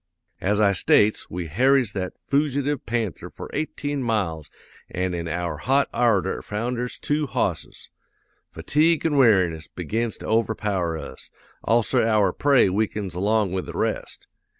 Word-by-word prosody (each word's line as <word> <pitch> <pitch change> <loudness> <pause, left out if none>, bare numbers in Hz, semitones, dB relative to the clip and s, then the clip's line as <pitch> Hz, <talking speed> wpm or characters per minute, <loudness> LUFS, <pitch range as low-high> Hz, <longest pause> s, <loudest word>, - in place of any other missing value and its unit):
"'As 105 +2 +1
I 100 -2 +4
states, 105 +3 +2
we 90 0 -4
harries 125 - +2
that 95 -2 -3
foogitive 145 -1 -1
panther 110 -6 -2
for - - -10
eighteen 145 -2 -3
miles 95 - -2 0.4
an' 90 0 -2
in 85 -1 -3
our 85 -1 -3
hot 135 - +1
ardor 110 -6 +1
founders 120 +3 -3
two 150 0 -1
hosses. - - -3 0.6
Fatigue 160 +1 +1
an' 155 -3 +1
weariness 95 - +3
begins 110 +6 -3
to - - -10
overpower 105 -6 0
us; - - -9 0.3
also 115 -1 +2
our 110 -3 +2
prey 140 -6 +4
weakens 100 -1 -2
along 100 +2 +1
with 95 -1 -3
the - - -7
rest. - - -3
110 Hz, 140 wpm, -24 LUFS, 90-130 Hz, 0.6 s, I